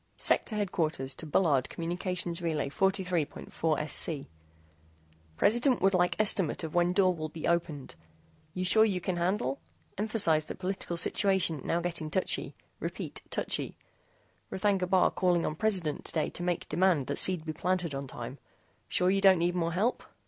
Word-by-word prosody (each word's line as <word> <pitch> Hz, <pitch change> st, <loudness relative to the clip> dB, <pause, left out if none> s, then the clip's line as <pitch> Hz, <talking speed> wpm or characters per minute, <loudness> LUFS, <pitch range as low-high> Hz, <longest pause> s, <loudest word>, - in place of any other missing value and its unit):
SEC -, -, +2 dB
HDQ 160 Hz, -, -2 dB
BULLARD, 145 Hz, -6 st, +2 dB
COM. 165 Hz, -, -6 dB
RLY. 170 Hz, -3 st, -1 dB
43.4SC 165 Hz, -5 st, -1 dB, 1.1 s
PRESIDENT 240 Hz, +4 st, +3 dB
WOULD 195 Hz, +1 st, +3 dB
LIKE 180 Hz, -1 st, +2 dB
ESTIMATE 195 Hz, -5 st, +2 dB
OF 160 Hz, -, -5 dB
WHEN 175 Hz, 0 st, +3 dB
DOOR 185 Hz, -1 st, +3 dB
WILL 155 Hz, -2 st, -5 dB
BE 160 Hz, -, -5 dB
OPENED. 170 Hz, -5 st, -1 dB, 0.6 s
YOU 185 Hz, 0 st, -2 dB
SURE 220 Hz, +4 st, +5 dB
YOU 195 Hz, -4 st, 0 dB
CAN 180 Hz, 0 st, -3 dB
HANDLE? 170 Hz, -6 st, -1 dB, 0.4 s
EMPHASIZE 200 Hz, -8 st, +3 dB
THAT -, -, -7 dB
POLITICAL 185 Hz, -2 st, -3 dB
SITUATION 185 Hz, -5 st, +2 dB
NOW 170 Hz, -, 0 dB
GETTING 170 Hz, -2 st, -2 dB
TOUCHY. 185 Hz, +4 st, -1 dB, 0.2 s
REPEAT -, -, -5 dB
TOUCHY. -, -, -1 dB, 0.7 s
R'THAGNA 190 Hz, -1 st, 0 dB
BAR 185 Hz, -1 st, +4 dB
CALLING 175 Hz, -2 st, +1 dB
ON 155 Hz, -, -2 dB
PRESIDENT 185 Hz, -6 st, 0 dB
TODAY 155 Hz, -, -1 dB
TO -, -, -7 dB
MAKE 175 Hz, -1 st, -2 dB
DEMAND 175 Hz, -6 st, +2 dB
THAT -, -, 0 dB
SEED 180 Hz, -4 st, +2 dB
BE 155 Hz, -, -3 dB
PLANTED 180 Hz, -1 st, -1 dB
ON 135 Hz, 0 st, -5 dB
TIME. 120 Hz, +2 st, -8 dB, 0.5 s
SURE 180 Hz, +1 st, +2 dB
YOU 195 Hz, 0 st, +1 dB
DON'T 190 Hz, -2 st, +6 dB
NEED 175 Hz, +1 st, +1 dB
MORE 170 Hz, -2 st, -1 dB
HELP? 215 Hz, +8 st, 0 dB
175 Hz, 150 wpm, -29 LUFS, 160-190 Hz, 1.1 s, DON'T